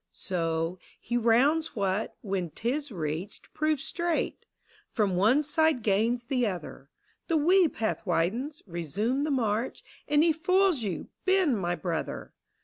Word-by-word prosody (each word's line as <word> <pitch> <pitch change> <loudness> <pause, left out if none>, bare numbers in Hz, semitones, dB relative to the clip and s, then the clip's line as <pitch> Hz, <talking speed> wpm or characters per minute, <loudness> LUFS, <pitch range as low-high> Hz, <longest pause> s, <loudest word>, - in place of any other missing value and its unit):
So, 165 0 -2 0.2
he 240 - -4
rounds 260 +8 +3
what, 200 0 -1
when 190 -4 -2
'tis 260 - -3
reached, 165 +2 -5
proves 305 -2 0
straight, 340 +1 -2 0.5
Prom 205 -5 +2
one 225 +11 +4
side 305 -3 +2
gains 225 +4 +1
the 245 -1 0
other: 165 -7 -6 0.4
The 330 - +2
wee 355 +4 +5
path 225 -7 -2
widens 220 - -1
— - - -45
resume 210 - -1
the - - -1
march, 235 -3 -1 0.2
And 295 +1 +4
he 330 -1 +4
foils 370 -2 +2
you, 190 -7 -4 0.2
Ben 375 -8 +3
my 175 -4 -1
brother! 170 -3 -4
235 Hz, 140 wpm, -28 LUFS, 190-305 Hz, 0.5 s, wee